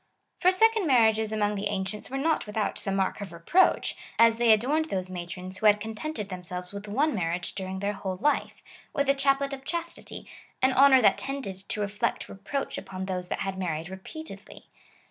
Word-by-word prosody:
For 365 Hz, -, +5 dB
second 445 Hz, 0 st, +3 dB
marriages 220 Hz, -4 st, +4 dB
among 210 Hz, -1 st, +1 dB
the 205 Hz, 0 st, -2 dB
ancients 200 Hz, 0 st, -4 dB
were 270 Hz, -, -3 dB
not 310 Hz, -3 st, 0 dB
without 210 Hz, 0 st, -2 dB
some 195 Hz, -1 st, -1 dB
mark 195 Hz, +2 st, 0 dB
of 195 Hz, -3 st, -6 dB
reproach, 170 Hz, -, +2 dB, 0.2 s
as 230 Hz, 0 st, +6 dB
they 235 Hz, -1 st, +5 dB
adorned 270 Hz, +9 st, +3 dB
those 185 Hz, -10 st, -3 dB
matrons, 180 Hz, +1 st, -6 dB
who 215 Hz, -, +4 dB
had 210 Hz, 0 st, +6 dB
contented 220 Hz, +2 st, -5 dB
them 180 Hz, -1 st, -6 dB
selves 180 Hz, +1 st, -6 dB
with 200 Hz, +1 st, -7 dB
one 280 Hz, +9 st, +1 dB
marriage 175 Hz, -2 st, -2 dB
during 190 Hz, -1 st, -5 dB
their 200 Hz, +1 st, 0 dB
whole 190 Hz, -2 st, -4 dB
life, 295 Hz, +10 st, 0 dB, 0.3 s
with 280 Hz, -1 st, 0 dB
a -, -, +6 dB
chaplet 275 Hz, 0 st, +1 dB
of 270 Hz, -1 st, -7 dB
chastity^ 340 Hz, +3 st, -5 dB, 0.2 s
— -, -, -31 dB
an 260 Hz, 0 st, +5 dB
honour 265 Hz, -1 st, +7 dB
that 195 Hz, -, +5 dB
tended 230 Hz, -9 st, -5 dB
to 210 Hz, -, -1 dB
reflect 205 Hz, 0 st, -1 dB
re -, -, -9 dB
proach 240 Hz, +9 st, -3 dB
upon 190 Hz, 0 st, -6 dB
those 180 Hz, -2 st, -3 dB
that -, -, -3 dB
had 195 Hz, -1 st, -3 dB
married 165 Hz, -2 st, -3 dB
repeatedly. 255 Hz, -, -10 dB
210 Hz, 200 wpm, -27 LUFS, 190-275 Hz, 0.3 s, honour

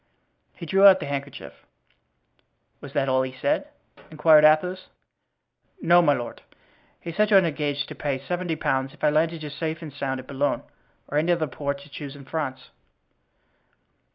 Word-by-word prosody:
And -, -, -26 dB
he -, -, -4 dB
drew 195 Hz, +4 st, +2 dB
out 190 Hz, -1 st, +7 dB
the 150 Hz, -, -5 dB
handkerchief. 140 Hz, -1 st, -6 dB, 1.3 s
"Was 140 Hz, -1 st, -10 dB
that 140 Hz, -2 st, 0 dB
all 130 Hz, 0 st, +2 dB
he 130 Hz, 0 st, -5 dB
said?" -, -, 0 dB, 0.4 s
inquired 155 Hz, 0 st, +5 dB
Athos. 180 Hz, +5 st, +3 dB, 0.9 s
"No, 175 Hz, -, +5 dB
my 150 Hz, -4 st, +4 dB
lord; 120 Hz, -3 st, -6 dB, 0.6 s
he 170 Hz, -, -7 dB
said 210 Hz, +4 st, +2 dB
you 210 Hz, -, +4 dB
had 190 Hz, -2 st, +6 dB
engaged 145 Hz, -2 st, -2 dB
to -, -, -6 dB
pay 140 Hz, -2 st, -2 dB
seventy 175 Hz, +4 st, -3 dB
pounds 135 Hz, -2 st, -1 dB
if -, -, -23 dB
I 150 Hz, -, +4 dB
landed 160 Hz, +1 st, 0 dB
you 150 Hz, -, -6 dB
safe 160 Hz, +2 st, -4 dB
and 150 Hz, -3 st, -8 dB
sound 135 Hz, -2 st, -3 dB
at 130 Hz, -, -10 dB
Boulogne 140 Hz, +2 st, -1 dB, 0.4 s
or 145 Hz, -, 0 dB
any 165 Hz, +3 st, +1 dB
other 170 Hz, -2 st, +1 dB
port 140 Hz, 0 st, -5 dB
you 145 Hz, -, -19 dB
choose 140 Hz, 0 st, -8 dB
in 140 Hz, -1 st, -12 dB
France." 130 Hz, -5 st, -5 dB
150 Hz, 180 wpm, -24 LUFS, 140-165 Hz, 1.3 s, out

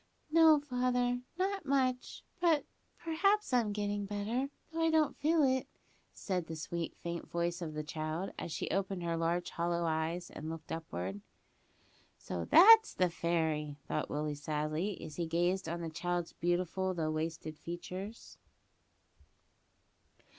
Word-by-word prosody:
"No, 320 Hz, -2 st, +7 dB
father, 250 Hz, -2 st, 0 dB, 0.2 s
not 390 Hz, 0 st, 0 dB
much; 260 Hz, -3 st, 0 dB, 0.2 s
but 330 Hz, -4 st, +3 dB, 0.3 s
perhaps 380 Hz, +2 st, +1 dB
I'm 235 Hz, -4 st, +3 dB
gettin' 205 Hz, -1 st, -2 dB
better, 215 Hz, +7 st, -1 dB, 0.2 s
though 330 Hz, -, -3 dB
I 325 Hz, -, +4 dB
don't 315 Hz, -1 st, +3 dB
feel 310 Hz, +2 st, +3 dB
it," 260 Hz, -1 st, +2 dB, 0.4 s
said 180 Hz, -4 st, -3 dB
the 160 Hz, -, -5 dB
sweet, 165 Hz, +2 st, -4 dB
faint 170 Hz, 0 st, -5 dB
voice 170 Hz, +1 st, -1 dB
of 155 Hz, -3 st, -4 dB
the 155 Hz, -, -2 dB
child, 155 Hz, +4 st, -3 dB
as -, -, -5 dB
she -, -, -3 dB
opened 195 Hz, -1 st, -1 dB
her 170 Hz, -1 st, 0 dB
large 170 Hz, +1 st, 0 dB
hollow 170 Hz, 0 st, 0 dB
eyes, 165 Hz, +2 st, -1 dB
and 155 Hz, +1 st, -6 dB
looked 160 Hz, -1 st, -7 dB
upward. 100 Hz, -, -4 dB, 1.0 s
"So, 85 Hz, -2 st, -4 dB
that's 445 Hz, +4 st, +8 dB
the 180 Hz, -2 st, +2 dB
fairy!" 160 Hz, -3 st, 0 dB
thought -, -, -2 dB
Willie 150 Hz, 0 st, -1 dB
sadly, 155 Hz, +6 st, -2 dB
as 155 Hz, -, -8 dB
he 170 Hz, -2 st, -1 dB
gazed 175 Hz, +2 st, +1 dB
on 170 Hz, +1 st, -3 dB
the 165 Hz, -, -3 dB
child's 175 Hz, +1 st, -2 dB
beautiful 180 Hz, +2 st, 0 dB
though 155 Hz, -2 st, 0 dB
wasted 155 Hz, 0 st, -4 dB
features. 185 Hz, +5 st, -7 dB
175 Hz, 145 wpm, -33 LUFS, 160-250 Hz, 1.0 s, that's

